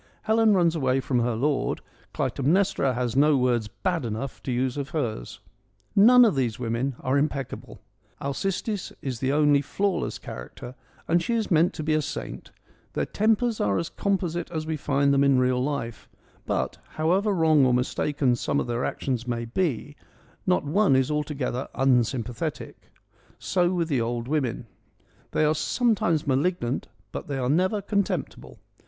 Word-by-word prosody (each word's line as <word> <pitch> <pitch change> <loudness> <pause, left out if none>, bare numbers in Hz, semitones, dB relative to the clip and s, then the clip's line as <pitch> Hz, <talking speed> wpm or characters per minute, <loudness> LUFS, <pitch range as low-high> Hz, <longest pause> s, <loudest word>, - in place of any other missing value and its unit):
Helen 220 -1 +4
runs 170 -2 +3
away 130 -3 +1
from 130 -1 0
her 120 -1 0
lord; 140 +4 0 0.3
Clytemnestra 140 -3 +1
has 125 -1 -2
no 145 +1 +5
words 120 -4 +1
bad 165 - -2
enough 115 +3 -4
to 130 - -4
use 125 +1 0
of 140 -1 -4
hers. 120 - -4 0.5
None 245 +5 +8
of 215 - +3
these 125 -5 -1
women 120 +2 -2
are 135 +1 +1
impeccable 140 -3 -4 0.2
— - - -38
Alcestis 195 +7 -2
is 130 -4 -3
the 130 +1 0
only 145 -1 +4
flawless 195 +6 -1
character 60 - -9 0.3
and 170 +1 +3
she 235 +7 -1
is 220 -3 -1
meant 165 +1 +3
to 155 - -4
be 155 +1 +1
a 155 - +2
saint - - -6 0.2
— - - -34
their - - -1
tempers 225 +2 +1
are 100 -1 +1
as 165 - -2
composite 180 -4 -2
as 160 -2 -4
we 160 0 -2
find 140 -1 +1
them 140 0 +4
in 140 -2 +4
real 125 0 +2
life; 135 -5 -4 0.4
but, - - -1 0.2
however 185 +7 +2
wrong 160 -6 +4
or 130 - +4
mistaken 125 +1 +1
some 140 +4 -1
of - - -1
their 120 0 -2
actions 125 -3 -2
may 120 -1 -2
be, 145 +1 -2 0.5
not 180 - +3
one 165 +1 +3
is 130 +2 +2
altogether 145 -4 -2
unsym 125 -2 +2
pathetic. 120 -2 -6 0.5
So 180 -1 +1
with 175 -3 0
the 135 -6 0
old 120 +1 -2
women. 135 -6 -1 0.6
They 155 - +1
are 150 - +3
some 235 +9 +1
times 165 -6 0
malignant, 140 -2 0 0.2
but - - -6
they 140 - -3
are 125 -1 -1
never 185 +6 +1
contemptible. 200 -1 -2
140 Hz, 170 wpm, -25 LUFS, 125-175 Hz, 0.6 s, None